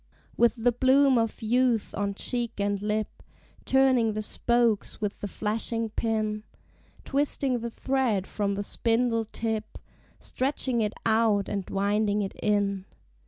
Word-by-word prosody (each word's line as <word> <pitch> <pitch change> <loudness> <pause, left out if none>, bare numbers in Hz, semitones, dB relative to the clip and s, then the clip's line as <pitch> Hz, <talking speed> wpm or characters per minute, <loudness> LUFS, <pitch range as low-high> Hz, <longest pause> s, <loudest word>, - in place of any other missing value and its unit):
With 235 0 +3
the 245 +1 +2
bloom 260 +1 +4
of 225 0 -2
youth 240 0 +1
on 200 -1 -2
cheek 235 0 -2
and 200 0 0
lip. 210 +1 -2 0.4
Turning 260 -4 +3
the 215 0 -3
spokes 235 -1 +1
with 210 -1 -3
the 205 - -2
flashing 225 +2 -2
pin, 215 -2 -1 0.6
Twisting 275 -2 0
the 235 +1 -4
thread 240 -6 0
from 200 -1 -2
the 205 - -3
spindle 230 +1 0
tip, 220 0 -4 0.4
Stretching 260 -2 -1
it 210 -1 -1
out 220 -3 +2
and 200 -2 -4
winding 205 +1 +1
it 195 - -5
in. 200 -2 0
225 Hz, 135 wpm, -27 LUFS, 205-240 Hz, 0.6 s, bloom